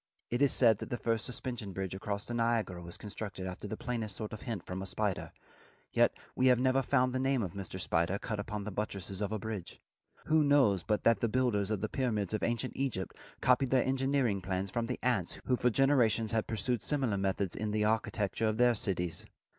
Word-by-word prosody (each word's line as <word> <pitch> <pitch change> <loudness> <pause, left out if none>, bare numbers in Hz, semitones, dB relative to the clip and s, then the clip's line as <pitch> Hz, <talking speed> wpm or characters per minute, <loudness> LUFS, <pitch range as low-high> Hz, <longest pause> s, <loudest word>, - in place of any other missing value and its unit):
It 120 +3 0
is 140 - +5
said 115 -5 +5
that - - -6
the 120 - -2
first 115 -2 0
suspension 120 -4 -4
bridge 95 -1 -3
across 100 +1 -3
the 120 - -5
Niagara 115 -6 0
was 85 0 -7
constructed 100 -2 -6
after 95 +2 -5
the 110 - -5
plainest 115 -5 -3
sort 110 -1 -5
of 110 - -7
hint 110 -7 -4
from 90 +1 -4
a 95 - -3
spider. 105 -1 -2 0.6
Yet - - +5 0.2
we 130 - +3
have 125 -1 +5
never 130 +1 +3
found 130 -2 +2
the 130 - 0
name 135 -2 +1
of 90 -3 -4
Mr. 95 -1 -6
Spider 85 +2 +1
cut 105 0 -4
upon 105 0 -4
the 105 - -5
buttresses 100 -1 -4
of 100 0 -1
a 110 - 0
bridge. 105 -4 -6 0.5
Who 155 0 +4
knows 135 - +4
but 105 +4 0
that 115 -3 +4
the 115 - +1
builders 110 -5 +1
of 105 -3 -1
the 110 - 0
pyramids 110 -6 -1
of 110 - 0
ancient 120 +2 -1
Egypt 130 -9 -2 0.3
copied 125 +1 +3
their 130 -2 +3
engineering 130 -6 +1
plans 95 +1 -2
from 115 -1 -1
the 125 - -2
ants 120 -9 0
who 125 - +3
for 125 - +2
generations 120 -4 +3
had 110 -1 0
pursued 115 +1 -1
similar 130 -9 0
methods 95 -1 -1
in 110 - -2
the 105 0 +1
architecture 110 0 0
of 110 0 0
their 125 0 +5
cities? 90 -6 -2
110 Hz, 220 wpm, -32 LUFS, 100-125 Hz, 0.6 s, is